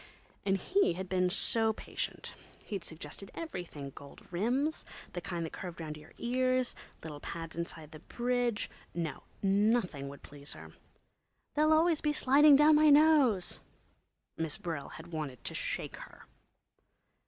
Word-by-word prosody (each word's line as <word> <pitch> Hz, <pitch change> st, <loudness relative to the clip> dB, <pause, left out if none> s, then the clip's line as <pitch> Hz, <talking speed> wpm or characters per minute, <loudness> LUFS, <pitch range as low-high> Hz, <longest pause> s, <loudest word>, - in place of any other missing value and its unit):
And 195 Hz, 0 st, +3 dB
he'd 190 Hz, -, +1 dB
been 185 Hz, -1 st, +2 dB
so 220 Hz, +3 st, +3 dB
patient. -, -, -5 dB, 0.3 s
He'd 200 Hz, -4 st, -4 dB
suggested 160 Hz, +4 st, -7 dB
everything—gold 150 Hz, -, -7 dB
rims, 255 Hz, -, 0 dB, 0.3 s
the 175 Hz, -, -3 dB
kind 170 Hz, -1 st, -3 dB
that 160 Hz, -, -7 dB
curved 175 Hz, -3 st, -7 dB
round 155 Hz, -2 st, -5 dB
your 150 Hz, -, -14 dB
ears, 255 Hz, +1 st, +1 dB, 0.3 s
little 150 Hz, -2 st, -7 dB
pads 165 Hz, +1 st, -6 dB
inside 165 Hz, -2 st, -5 dB
the 155 Hz, -, -10 dB
bridge. 245 Hz, +3 st, 0 dB, 0.3 s
No, 165 Hz, -3 st, -3 dB, 0.2 s
nothing 195 Hz, -7 st, +2 dB
would 140 Hz, -, -11 dB
please 145 Hz, 0 st, -6 dB
her. 80 Hz, 0 st, -11 dB, 0.8 s
"They'll 305 Hz, +1 st, +3 dB
always 320 Hz, 0 st, +4 dB
be 300 Hz, -1 st, +1 dB
sliding 290 Hz, +1 st, +7 dB
down 300 Hz, +2 st, +7 dB
my 305 Hz, 0 st, +6 dB
nose!" 285 Hz, -, +5 dB, 0.8 s
Miss 160 Hz, -2 st, -2 dB
Brill 160 Hz, -5 st, -4 dB
had 165 Hz, +2 st, -11 dB
wanted 145 Hz, -6 st, -4 dB
to -, -, -3 dB
shake -, -, -3 dB
her. -, -, -12 dB
190 Hz, 140 wpm, -32 LUFS, 160-255 Hz, 0.8 s, sliding